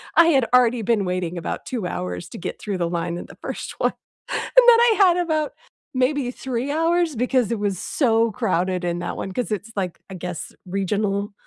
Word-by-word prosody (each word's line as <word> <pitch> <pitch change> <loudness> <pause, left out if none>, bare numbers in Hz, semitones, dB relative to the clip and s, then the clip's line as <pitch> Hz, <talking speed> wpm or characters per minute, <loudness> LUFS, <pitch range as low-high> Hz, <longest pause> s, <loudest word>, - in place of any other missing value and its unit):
I 335 - +7
had 270 -7 +4
already 245 -2 +5
been 210 -2 +1
waiting 180 -1 -2
about 165 - -4
2 240 -7 -3
hours 90 - -4
to - - -9
get - - -5
through 200 -3 -3
the 170 -1 0
line 170 0 -2
in - - -7
the - - -14
first - - -5
one. - - +2 0.4
And - - -4
then 465 -1 +8
I 470 -2 +5
had 365 -3 +5
about, 315 -4 0 0.4
maybe 255 0 +1
3 260 +1 -3
hours 330 0 +1
because 250 -1 +1
it 230 - -1
was 200 -2 -1
so 230 - +2
crowded 185 -5 0
in 175 0 -1
that 175 - -4
one, 195 - -4
'cause 245 +3 -3
it's 210 +2 -3
like, 185 -4 -3
I - - -8
guess, 180 -2 -6
regional 200 +2 -1
220 Hz, 205 wpm, -23 LUFS, 180-265 Hz, 0.4 s, then